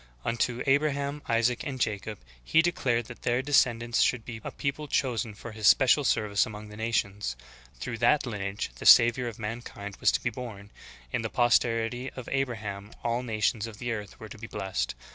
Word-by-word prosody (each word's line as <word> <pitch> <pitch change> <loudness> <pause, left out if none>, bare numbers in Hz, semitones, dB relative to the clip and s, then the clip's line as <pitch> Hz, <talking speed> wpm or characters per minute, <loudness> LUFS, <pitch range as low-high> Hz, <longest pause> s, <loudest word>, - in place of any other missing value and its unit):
Unto 120 +1 0
Abraham, 140 +1 +1
Isaac, 115 +1 +2
and 135 -4 -5
Jacob 105 -2 -2 0.3
He 160 - +4
declared 125 -9 0
that 120 +1 -11
their 120 +2 +1
descend 125 -5 +3
ants 120 -1 +1
should 120 -3 +2
be 115 -2 -7
a - - -4
people 150 +1 -3
chosen 120 -6 -1
for 120 +3 -9
His 110 -1 0
special 135 +2 +6
service 105 -5 +2
among 105 -1 -7
the 105 - -10
nations. 105 - -1 0.4
Through 115 -3 -5
that 135 +5 +3
lineage 100 - -4
the - - -1
Savior 120 +1 +7
of 115 - -6
mankind 105 -2 -6
was - - +4
to - - 0
be 120 - 0
born; 105 -4 -8 0.4
in - - 0
the 110 - -3
posterity 120 +1 +2
of 130 - -7
Abraham 105 -7 -3
all 120 +1 0
nations 110 -1 0
of 110 -2 -10
the 120 +2 -3
earth 105 -3 -6
were 110 - -9
to 105 - -11
be 110 - -7
blessed. 65 - -3
115 Hz, 190 wpm, -28 LUFS, 105-125 Hz, 0.4 s, Savior